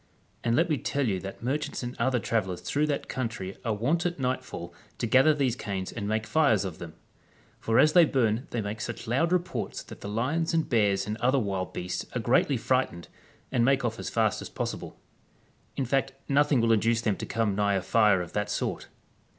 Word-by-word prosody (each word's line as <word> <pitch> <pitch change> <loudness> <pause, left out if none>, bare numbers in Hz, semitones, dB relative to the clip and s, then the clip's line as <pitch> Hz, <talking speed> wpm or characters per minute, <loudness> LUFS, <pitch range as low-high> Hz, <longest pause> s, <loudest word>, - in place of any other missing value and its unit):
And 115 0 +2
let 165 +5 +3
me 150 -5 0
tell 140 -2 -1
you 95 -3 0
that 95 +4 -8
merchants 140 +2 -2
and 120 +1 -5
other 125 +1 +2
travellers 95 -6 -1
through 150 +2 0
that 145 -2 -2
country 110 -7 -4
are 115 -3 0
wont 145 +11 +1
at 175 0 -1
nightfall 130 -9 -3 0.2
to - - -1
gather 130 +6 +5
these 135 -5 +1
canes 100 -6 -4
and 105 -3 -4
make 110 +1 0
fires 110 -4 +3
of 90 -4 -6
them; 85 -2 -8 0.6
for 115 0 +1
as 155 0 +6
they 175 - +8
burn 120 -4 +1
they 120 - -2
make 105 +1 -5
such 115 - -5
loud 135 +9 +1
reports 180 -1 -2
that - - -12
the 100 - -5
lions 145 +10 0
and 160 - +1
bears 100 -5 +2
and 105 +1 -3
other 130 +3 +2
wild 100 -6 -2
beasts 90 0 -3
are - - +1
greatly 125 +4 +2
fright 130 +3 +1
ened, 85 -1 -11 0.4
and 120 -3 +2
make 135 0 +3
off 115 -1 -2
as - - -4
fast - - +1
as - - -7
possible; - - -5 0.8
in 135 - 0
fact 135 +2 0
nothing 145 -2 +3
will 115 0 +3
induce 115 +1 +3
them 110 -4 +1
to - - -6
come 110 -3 0
nigh 100 0 +1
a 95 - 0
fire 100 -2 +4
of 85 - -11
that 105 0 -1
sort. - - -2
115 Hz, 215 wpm, -28 LUFS, 105-135 Hz, 0.8 s, they